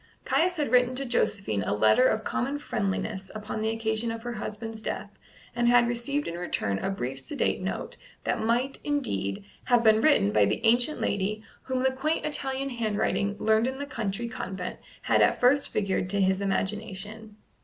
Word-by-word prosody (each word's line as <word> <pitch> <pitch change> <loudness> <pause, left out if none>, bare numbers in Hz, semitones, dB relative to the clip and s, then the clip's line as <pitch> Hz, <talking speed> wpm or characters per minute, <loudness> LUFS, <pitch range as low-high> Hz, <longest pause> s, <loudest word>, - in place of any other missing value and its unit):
Caius 355 +2 +2
had 295 -8 -1
written 250 0 +4
to 275 +1 -3
Josephine 200 - 0
a 100 - -1
letter 110 - +5
of 220 -2 0
common 255 +5 -1
friendliness 195 -6 -3
upon 215 0 -4
the 220 - +1
occasion 225 0 -1
of 225 0 -6
her 240 0 -4
husband's 220 0 -6
death, - - -4 0.4
and 240 0 +2
had 240 0 +5
received 240 +5 -1
in - - -3
return 100 - -1
a - - -2
brief 135 -8 -3
sedate 280 - -1
note - - -4 0.3
that - - -1
might, 245 +4 0
indeed, 100 - -2 0.2
have 245 -2 +4
been 220 -1 +5
written 100 - +5
by 105 -1 +4
the - - 0
ancient 245 +6 +3
lady 205 +2 -1 0.2
whom 260 -1 -1
the 265 - +4
quaint 300 +5 -1
Italian 275 -2 -1
handwriting 210 -4 0
learned 220 +2 +3
in 265 0 -3
the 285 - -4
country 230 -4 -3
convent 190 -7 -5 0.2
had - - +3
at - - +3
first 270 +3 +4
figured 190 -3 -1
to 200 +1 +1
his 190 0 +2
imagination. 205 +2 -3
225 Hz, 180 wpm, -27 LUFS, 195-255 Hz, 0.4 s, letter